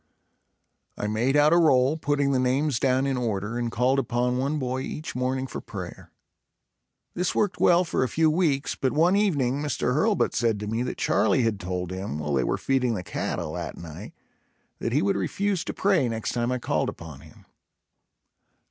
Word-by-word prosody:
I - - -3
made 115 +7 +1
out 150 +2 +5
a - - +5
roll, 135 -4 +4
putting 145 -3 0
the 130 - +2
names 130 +1 +1
down 130 0 +2
in 135 -2 0
order 110 -1 -2
and 120 -1 -2
called 130 +4 +2
upon 125 0 0
one 140 +4 0
boy 130 -2 -2
each 150 +1 -6
morning 130 +1 -1
for - - -6
prayer. - - -8 1.0
This 180 +1 -1
worked 205 -3 0
well 175 +1 +5
for 165 - -1
a 130 - -1
few 160 0 +2
weeks, 155 -5 +1
but 130 - -1
one 170 +5 +3
evening 145 -10 +1
Mr. 145 -4 -1
Hurlbut 200 - +2
said 115 -2 +1
to - - -3
me 115 +2 -1
that 125 - -3
Charlie 130 - +2
had 110 -3 0
told 90 -1 -4
him, 95 -5 -4
while 75 -1 -3
they 65 -2 +2
were - - 0
feeding 125 -3 0
the 90 - -4
cattle, - - -3
that - - -5
night, 80 -3 -9 0.7
that 115 - -2
he 145 +7 +2
would 200 -1 +1
refuse 200 -3 -1
to - - -3
pray 190 -11 +2
next 115 -1 -3
time 120 0 -1
I 125 - 0
called 120 - -1
upon 80 -4 -9
him. 75 +1 -17
130 Hz, 190 wpm, -26 LUFS, 115-150 Hz, 1.0 s, out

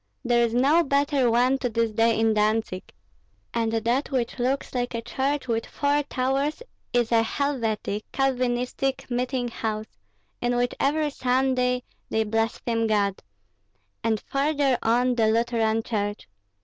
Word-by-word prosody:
There 240 0 +3
is 235 0 0
no 285 +7 +4
better 280 -3 +2
one 250 +3 +3
to 250 - -1
this 230 0 0
day 225 +1 +2
in 225 0 +3
Dantzig. 215 -3 0 0.6
And 230 -1 0
that 235 +5 0
which 255 -2 -2
looks 260 +3 -1
like 245 -1 -2
a 230 - -2
church 270 +4 -1
with 230 -1 -1
four 285 +1 +1
towers 275 - -1 0.3
is 240 -1 +1
a 230 -1 +5
Helvetic 225 -5 -2
(Calvinistic) 260 0 -1
meeting 245 0 -1
house, 215 - -4 0.4
in 245 0 +1
which 245 0 +1
every 295 +2 +1
Sunday 250 -1 +1 0.3
they 220 - +1
blaspheme 225 +1 -1
God; 200 -3 +1 0.8
and 220 -1 +1
farther 280 -1 +1
on 245 +2 +2
the 225 -2 +2
Lutheran 225 0 +1
church. 205 -2 -3
245 Hz, 140 wpm, -25 LUFS, 225-265 Hz, 0.8 s, a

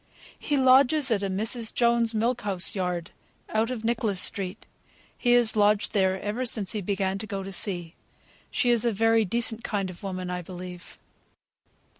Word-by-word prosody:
"He 290 - -1
lodges 265 +1 +4
at 210 -3 +1
a 200 - -2
Mrs. 220 +4 0
Jones's, 235 -1 +3
Milk 235 +2 0
House 195 -3 +2
Yard, 180 -3 -3 0.4
out 220 +2 0
of 235 -3 -5
Nicholas 225 -4 0
Street. 195 +1 -1 0.5
He 245 -1 +1
has 240 -2 +4
lodged 210 0 +2
there 190 -2 +1
ever 210 +6 -3
since 215 -6 0
he 210 - -2
began 195 0 -2
to 215 - -6
go 195 -3 -4
to 195 - -7
sea; 175 -4 +1 0.6
she 245 - +1
is 235 -2 +1
a 235 - +1
very 225 +1 +2
decent 230 +2 -1
kind 195 -3 -2
of 175 - -14
woman, 185 -2 -5
I 180 0 -3
believe." 180 0 -10
210 Hz, 175 wpm, -26 LUFS, 190-235 Hz, 0.6 s, lodges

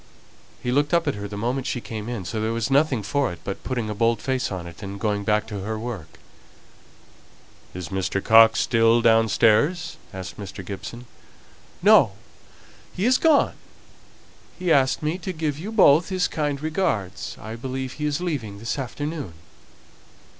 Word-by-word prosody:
He 125 - -1
looked 145 +4 +2
up 170 -1 +1
at 145 - +2
her 100 0 -6
the 105 0 -7
moment 125 +5 -2
she 125 - -2
came 110 -1 -6
in, 115 -7 -4
so 110 +5 -3
there 110 +1 0
was 115 +2 -2
nothing 135 -5 +3
for 140 0 0
it 85 - -8
but 100 - -5
putting 120 -4 -2
a 105 - -3
bold 115 +1 +1
face 130 0 -1
on 90 -3 -5
it, 85 +3 -11
and 100 0 -6
going 105 -1 -1
back 105 0 +1
to 105 -3 -6
her 110 +3 -3
work. 110 -7 -7 1.6
"Is 90 -3 -6
Mr. 95 +1 -1
Coxe 110 +2 +6
still 115 -1 +3
downstairs?" 115 - +3
asked 95 -1 -7
Mr. 95 -2 -8
Gibson. 110 +5 -7 0.8
"No. - - +6 0.8
He 190 - -2
is 255 +1 +4
gone. 315 -3 +4 1.0
He 180 -2 -1
asked 135 +2 +2
me 155 +4 -1
to 185 - -4
give 155 -4 -3
you 200 +7 -5
both 170 -6 +5
his 185 -1 +1
kind 145 -2 -2
regards. 155 - -2
I 110 +2 -7
believe 130 +2 -5
he 150 0 -3
is 145 +1 -1
leaving 140 - -3
this 115 +6 -3
afternoon." 145 - -5
115 Hz, 170 wpm, -24 LUFS, 105-145 Hz, 1.6 s, Coxe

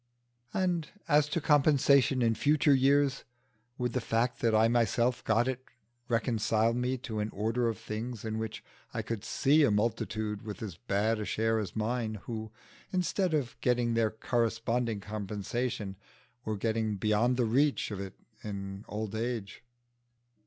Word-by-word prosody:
And 180 -4 0 0.2
as 145 0 +4
to 170 - 0
compensation 140 -3 +4
in 115 -1 +3
future 145 +6 +3
years, 135 +1 +3 0.5
would 125 -2 -1
the 125 - 0
fact 115 +2 0
that 115 -2 +2
I 110 +1 +5
myself 120 +1 +1
got 115 +2 +2
it 130 0 -2 0.4
reconcile 115 -1 +1
me 125 +2 0
to 115 -3 -5
an 105 +1 -1
order 115 +4 0
of 115 - -1
things 110 +1 -5
in 110 0 -2
which 110 -1 -5 0.3
I - - -1
could 115 -3 -4
see 150 +3 +3
a 140 - +5
multitude 110 -1 -1
with 110 0 -7
as 100 -6 -5
bad 110 +2 0
a 105 - -3
share 110 +1 +1
as 100 -5 -5
mine, 110 0 -1
who, 110 -2 -5 0.4
instead 180 -1 +1
of 135 -5 -2
getting 120 -1 +2
their 115 -1 +2
corresponding 115 0 -1
compensation, 105 0 -3 0.5
were 110 -1 -2
getting 110 0 0
beyond 110 +5 +2
the 125 - +2
reach 135 +3 +2
of 100 - -4
it 95 -1 -6 0.3
in 100 -1 -6
old 105 0 -4
age? 115 -2 -3
115 Hz, 155 wpm, -30 LUFS, 110-125 Hz, 0.5 s, I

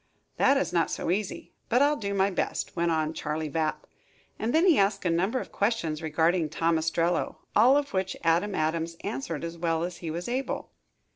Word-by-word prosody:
"That 275 - +4
is 275 - -1
not 170 -1 +2
so - - -2
easy, 200 +1 -3 0.2
but 245 - +4
I'll 295 +1 +3
do 200 -6 -3
my 195 +1 +2
best," 185 - -2
went 170 -1 +1
on 160 -1 0
Charley 155 0 -3
Vapp, 160 -1 -1 0.5
and 225 - -1
then 325 +6 +4
he 340 - +5
asked 195 0 +1
a 175 - +2
number 190 +10 +1
of - - -8
questions 185 -8 -1
regarding 160 +1 +1
Tom 165 +1 +1
Ostrello, 165 +2 0 0.2
all 250 +6 +6
of 285 -1 -2
which 190 0 -1
Adam 175 +5 +2
Adams 160 +1 -1
answered 140 +4 -4
as 170 0 -6
well 165 -1 0
as 175 0 -4
he 165 - -6
was 170 +3 -4
able. 255 +3 -3
170 Hz, 200 wpm, -27 LUFS, 160-205 Hz, 0.5 s, all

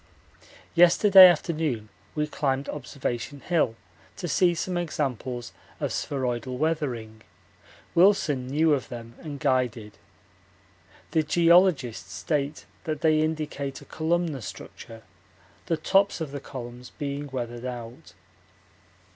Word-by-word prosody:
Yesterday 185 +2 +8
afternoon 155 -9 0 0.3
we 150 -1 +1
climbed 140 -2 -1
Observation 140 -1 -4
Hill 160 -10 +1 0.4
to 175 - -4
see 175 +2 +3
some 180 +2 -3
examples 130 -7 -3 0.3
of - - -2
spheroidal 125 -2 -2
weathering 125 -8 -2 0.7
Wilson 170 -8 +3
knew 155 +3 +3
of 135 -3 -2
them 115 -1 -8
and 145 -3 -7
guided. 125 -6 -1 1.1
The 160 - +3
geologists 155 - +3
state 145 - -2 0.2
that 155 -3 -3
they 155 -1 +4
indicate 150 -3 -2
a - - -13
columnar 160 -3 -1
structure, 115 +1 -10 0.6
the 165 - +1
tops 195 +4 +2
of 155 -4 -4
the 140 - -5
columns 125 -2 -8
being 145 -1 -4
weathered 120 -2 -5
out. 120 - -8
145 Hz, 115 wpm, -26 LUFS, 125-160 Hz, 1.1 s, Yesterday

